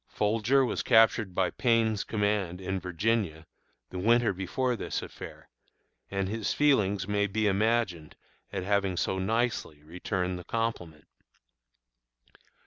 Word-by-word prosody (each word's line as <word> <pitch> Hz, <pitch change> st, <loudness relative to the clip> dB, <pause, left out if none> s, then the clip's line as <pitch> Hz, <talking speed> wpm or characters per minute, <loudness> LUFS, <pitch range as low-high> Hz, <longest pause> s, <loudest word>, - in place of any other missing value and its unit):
Folger 115 Hz, +6 st, +2 dB
was -, -, -2 dB
captured 110 Hz, -5 st, +4 dB
by 95 Hz, -2 st, +1 dB
Payne's 115 Hz, -4 st, +1 dB
command, 100 Hz, -4 st, -1 dB
in 95 Hz, 0 st, -3 dB
Virginia, 90 Hz, -2 st, -1 dB, 0.5 s
the 90 Hz, -, -5 dB
winter 115 Hz, +2 st, +3 dB
before 120 Hz, +7 st, -1 dB
this -, -, -4 dB
affair, -, -, -10 dB, 0.6 s
and 95 Hz, -1 st, -2 dB
his 110 Hz, +1 st, -2 dB
feelings 105 Hz, -10 st, +2 dB
may 105 Hz, 0 st, +1 dB
be 110 Hz, +2 st, -1 dB
imagined 100 Hz, -5 st, 0 dB, 0.4 s
at 95 Hz, -2 st, -3 dB
having 100 Hz, -2 st, 0 dB
so 95 Hz, -, -1 dB
nicely 110 Hz, -7 st, -1 dB
returned 90 Hz, +2 st, -3 dB
the -, -, -9 dB
compliment. 90 Hz, -10 st, -3 dB
100 Hz, 125 wpm, -28 LUFS, 90-115 Hz, 0.6 s, captured